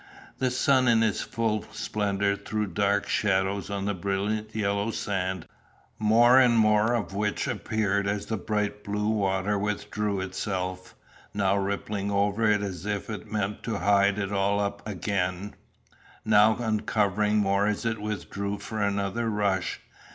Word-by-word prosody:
The 130 0 +2
sun 130 0 +3
in 115 -1 +4
his 110 -3 +1
full 110 -2 -1
splendour 100 -1 -1
threw 105 +1 -3
dark 100 +2 0
shadows 95 -2 0
on 100 -1 -3
the 105 - 0
brilliant 100 +3 -2
yellow 100 0 0
sand, 95 -5 -2 0.5
more 120 +4 +6
and 120 -3 +5
more 105 +1 +4
of 110 -4 -3
which 105 +1 -1
appeared 100 -2 -1
as 100 0 -1
the 110 - -2
bright 105 +1 -2
blue 105 +1 -1
water 100 -1 0
withdrew 105 0 -2
itself, 95 -1 -4 0.4
now 100 -1 +2
rippling 100 0 -2
over 100 +2 +2
it 105 -1 +2
as 95 -1 -5
if 105 +1 -3
it 105 0 -7
meant 105 -1 -2
to 115 -3 -3
hide 100 0 +3
it 100 -1 -2
all 100 0 +1
up 100 0 -2
again, 100 -1 -2 0.7
now 110 +2 +5
uncovering 105 -2 +1
more 100 0 +2
as 105 +2 -1
it 110 -2 -1
withdrew 100 -1 -3
for 110 +1 -5
another 100 +3 0
rush. 100 -4 -1
105 Hz, 150 wpm, -27 LUFS, 100-105 Hz, 0.7 s, more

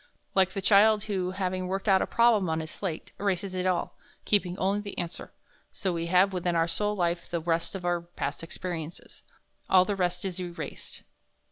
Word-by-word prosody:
Like 190 -1 +3
the 195 - -4
child 210 +1 +5
who, 190 -4 -1
having 185 -1 -2
worked 195 +3 -3
out 190 -2 +5
a - - 0
problem 230 -6 +4
on 160 0 0
his 160 -1 -5
slate, 175 -5 -5
erases 195 -1 -1
it 185 0 -1
all, 180 -2 -1 0.3
keeping 190 -3 +1
only 195 +2 +1
the 205 -1 -8
answer, 170 0 -5 0.4
so 190 -2 -2
we 170 0 -2
have 185 +3 +4
within 175 -1 0
our 165 0 +3
soul 210 +4 0
life 170 -2 -1
the 170 - -1
result 165 +2 -1
of 180 -2 -5
our 175 -1 +1
past 170 +1 -5
experiences; 165 -1 -7 0.5
all 185 -1 +6
the 205 - -1
rest 180 0 -1
is 185 -1 -3
erased. 175 -1 -7
185 Hz, 195 wpm, -28 LUFS, 175-195 Hz, 0.5 s, all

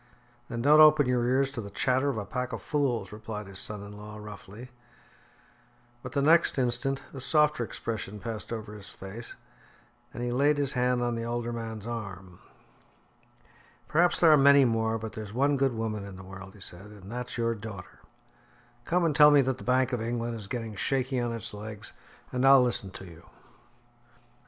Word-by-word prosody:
"Then 120 -1 -4
don't 150 +3 +6
open 155 -2 +7
your 125 -1 +1
ears 135 +2 +2
to 130 -4 -4
the 100 - -8
chatter 130 +7 +1
of 130 - -2
a 105 - -3
pack 125 +4 -4
of - - -5
fools," 140 -6 -1
replied 105 0 -6
his 95 -1 -7
son 105 -1 -4
in 100 0 -10
law 105 +1 -9
roughly. 105 +3 -10 1.3
But 125 - -8
the 140 -1 +1
next 165 +1 +4
instant 130 +2 0
a 135 - -7
softer 150 0 +3
expression 105 -2 -5
passed 110 -2 -6
over 110 -2 -5
his 105 -2 -9
face, 100 +5 -8 0.8
and 120 - -6
he 120 - -1
laid 145 +4 +3
his 140 -2 +1
hand 125 -1 +1
on 120 0 0
the 115 0 -3
older 120 0 -3
man's 110 -2 -6
arm. 100 -6 -7 1.5
"Perhaps 175 +3 +3
there 165 -2 +6
are 155 - +7
many 140 0 +6
more, 115 -1 +1
but 110 0 -7
there's 105 -2 -7
one 140 +3 +3
good 135 -3 +1
woman 110 -2 -3
in 100 -1 -9
the 95 - -10
world," 95 +1 -11
he 100 - -16
said, 90 +2 -8
"and 105 -1 -12
that's 125 +1 -5
your 115 0 +1
daughter. 105 -4 -9 0.9
Come 175 0 +1
and 155 -3 +1
tell 150 -1 +8
me 145 -1 +6
that 130 -1 -1
the - - -9
Bank 130 0 +2
of 120 - -1
England 120 +1 -2
is 105 -3 -8
getting 115 -1 -4
shaky 130 +4 -1
on 120 -1 -1
its 115 -1 -5
legs, 105 0 -8 0.4
and 125 0 -1
I'll 135 -1 +7
listen 120 -5 -1
to 95 - -10
you." 85 -2 -14
120 Hz, 195 wpm, -28 LUFS, 105-130 Hz, 1.5 s, tell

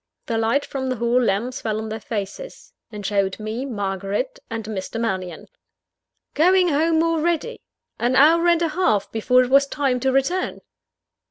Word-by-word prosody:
The 230 -2 -1
light 230 +6 +1
from 265 -1 -4
the 255 - -1
hall 235 +2 +1
lamps 235 +3 -1
fell 215 -2 -2
on 220 0 -4
their 220 +1 -4
faces; 215 - -6 0.2
and 210 -2 -8
showed 195 -1 0
me 220 +5 -4
Margaret 200 - -3
and 225 -2 -5
Mr. 215 +1 -5
Mannion. 185 -7 -3 0.9
Going 360 +3 +4
home 320 +2 +2
already! 330 +6 -1 0.4
An 245 +2 +1
hour 330 +5 +5
and 340 0 +3
a 330 - +1
half 305 - 0
before 250 +3 +3
it 250 - -5
was 275 +1 +5
time 275 -3 0
to 265 +1 +1
return! 270 +8 0
250 Hz, 165 wpm, -22 LUFS, 215-310 Hz, 0.9 s, hour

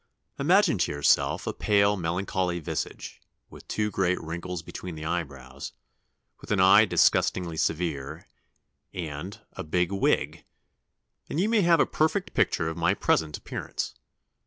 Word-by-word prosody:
Imagine - - +3
to - - +1
yourself 75 0 +2
a - - -2
pale 100 0 +2
melancholy 90 0 -1
visage, 80 - -5 0.3
with - - -14
two 105 -1 -1
great 90 -2 +1
wrinkles 85 +1 -5
between 90 0 -7
the 80 0 -7
eyebrows, 70 -5 -5 0.7
with - - -13
an 105 - +2
eye 95 +3 +7
disgustingly 90 -3 +2
severe, 80 -2 -2 0.7
and, 85 +2 -6
a 95 - -6
big 90 +3 0
wig, 100 - 0 0.9
and 155 - -2
you 195 - +2
may 225 -1 +3
have 170 -2 +4
a - - +5
perfect 170 +5 0
picture 80 - +1
of 80 +1 -4
my 85 +4 +2
present 80 -5 +1
appearance.... - - -5
90 Hz, 140 wpm, -27 LUFS, 80-100 Hz, 0.9 s, eye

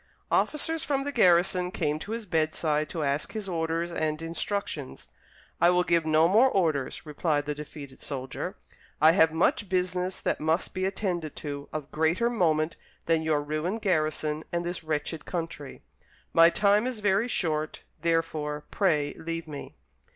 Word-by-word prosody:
Officers 320 +2 +1
from 275 -1 0
the 285 - -3
garrison 180 -5 +4
came 155 -4 -1
to 200 - -7
his 230 -1 -3
bedside 155 -3 0
to 165 -3 -3
ask 140 +1 -1
his 215 -3 -4
orders 165 -1 -1
and 155 -2 -1
instructions. 165 -3 -4 0.5
"I 170 - +7
will 180 0 +4
give 170 -2 +2
no 155 +1 +5
more 225 +8 +5
orders," 160 - 0
replied 150 -1 0
the 150 - -1
defeated 145 -2 -9
soldier; 130 -2 -5 0.4
"I 155 +2 +7
have 160 -2 +5
much 180 +5 +1
business 185 0 -1
that - - -1
must 160 +3 0
be 185 0 -1
attended 180 -5 -2
to, 145 -1 -6
of 150 -2 -5
greater 165 +10 +2
moment 160 -7 +1 0.3
than 165 -1 +2
your 155 -2 +1
ruined 155 +9 -2
garrison 155 -4 0
and 170 0 -1
this 175 -1 -4
wretched 155 0 -3
country. 165 -6 -5 0.5
My 165 0 +8
time 205 +5 +3
is 250 -4 -4
very 205 +2 +2
short, 155 -8 -1 0.2
therefore, 160 -3 -1
pray 150 -7 +1
leave 165 0 -4
me." 145 -2 -8
165 Hz, 160 wpm, -28 LUFS, 155-185 Hz, 0.5 s, My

